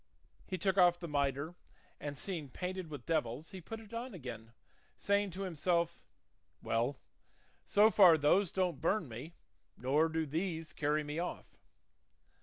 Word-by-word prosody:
He 185 Hz, -, -2 dB
took 190 Hz, +2 st, +1 dB
off 175 Hz, -1 st, +6 dB
the 170 Hz, -, -5 dB
mitre, 140 Hz, +1 st, 0 dB, 0.5 s
and 145 Hz, -1 st, -5 dB
seeing 165 Hz, -6 st, -4 dB
painted 180 Hz, +3 st, -4 dB
with 145 Hz, -5 st, -8 dB
devils 155 Hz, -1 st, -1 dB
he 190 Hz, -2 st, -8 dB
put 225 Hz, +7 st, -7 dB
it 225 Hz, 0 st, -14 dB
on 235 Hz, -1 st, -4 dB
again, 115 Hz, -7 st, -8 dB, 0.5 s
saying 200 Hz, 0 st, +1 dB
to 190 Hz, +2 st, -5 dB
himself, 170 Hz, -1 st, 0 dB, 0.6 s
"Well, 120 Hz, +5 st, 0 dB, 0.7 s
so 210 Hz, +2 st, +6 dB
far 180 Hz, -7 st, +8 dB
those 160 Hz, +6 st, +3 dB
don't 180 Hz, -6 st, 0 dB
burn 180 Hz, +1 st, +1 dB
me 130 Hz, +8 st, -8 dB, 0.4 s
nor 145 Hz, +6 st, +2 dB
do 160 Hz, 0 st, -1 dB
these 160 Hz, +1 st, -3 dB
carry 150 Hz, +1 st, +1 dB
me 150 Hz, +2 st, -4 dB
off." 180 Hz, -, -5 dB
165 Hz, 150 wpm, -34 LUFS, 145-185 Hz, 0.7 s, far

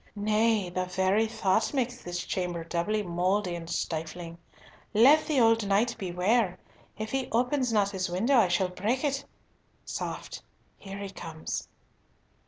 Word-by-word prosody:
Nay, 210 Hz, -2 st, +1 dB
the 185 Hz, +1 st, -1 dB
very 190 Hz, +4 st, +2 dB
thought 220 Hz, +2 st, +1 dB
makes 250 Hz, -1 st, -1 dB
this 175 Hz, 0 st, -4 dB
chamber 175 Hz, -2 st, -2 dB
doubly 180 Hz, +6 st, -1 dB
mouldy 180 Hz, +2 st, 0 dB
and 170 Hz, -1 st, -6 dB
stifling! 165 Hz, +1 st, -4 dB, 0.6 s
Let 275 Hz, +8 st, +6 dB
the 300 Hz, -4 st, +2 dB
old 225 Hz, -2 st, +4 dB
knight 215 Hz, +4 st, +2 dB
beware. 185 Hz, +2 st, +1 dB, 0.4 s
If 215 Hz, +1 st, -4 dB
he 270 Hz, -1 st, -1 dB
open 250 Hz, +4 st, +1 dB
not 205 Hz, -2 st, +2 dB
his 185 Hz, -2 st, -2 dB
window 225 Hz, +10 st, +2 dB
I 225 Hz, -, +5 dB
shall 180 Hz, +1 st, +1 dB
break 220 Hz, +9 st, -1 dB
it! 280 Hz, -1 st, 0 dB, 0.6 s
Soft. -, -, -5 dB, 0.4 s
Here 195 Hz, 0 st, -8 dB
he 200 Hz, -1 st, -6 dB
comes." 160 Hz, -4 st, -5 dB
200 Hz, 145 wpm, -28 LUFS, 180-230 Hz, 0.6 s, Let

